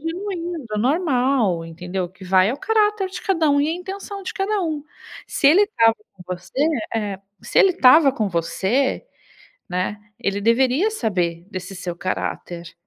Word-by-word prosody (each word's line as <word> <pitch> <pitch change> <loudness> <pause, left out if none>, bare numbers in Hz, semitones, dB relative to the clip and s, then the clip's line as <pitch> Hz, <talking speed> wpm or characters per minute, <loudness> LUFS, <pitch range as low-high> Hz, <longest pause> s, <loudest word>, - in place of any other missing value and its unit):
genuíno, 345 -1 -4
normal, 255 - +1
entendeu 180 +3 -4
o - - -13
que 190 0 -14
vai 185 +2 +4
é 255 - -2
o - - -11
caráter 420 -3 +1
de - - -7
cada 330 -6 +1
um 285 0 +3
e 295 - +1
a - - 0
intenção 390 +2 -7
de 375 - -5
cada 400 +1 0
um. 310 -3 -3 0.4
Se - - 0
ele 370 +7 +6
estava 230 - +3 0.2
com 190 - -15
você, 270 - -1 0.3
eh, 205 -3 -2 0.2
se - - 0
ele 390 - +7
estava 280 -3 +6
com 215 -6 -1
você, 195 - 0 0.6
né, 185 +3 -2 0.2
ele 200 0 -1
deveria 260 - +3
saber 175 - -2
desse 185 +1 -6
seu 180 -1 -5
caráter 175 -1 -4
260 Hz, 170 wpm, -21 LUFS, -, 0.6 s, ele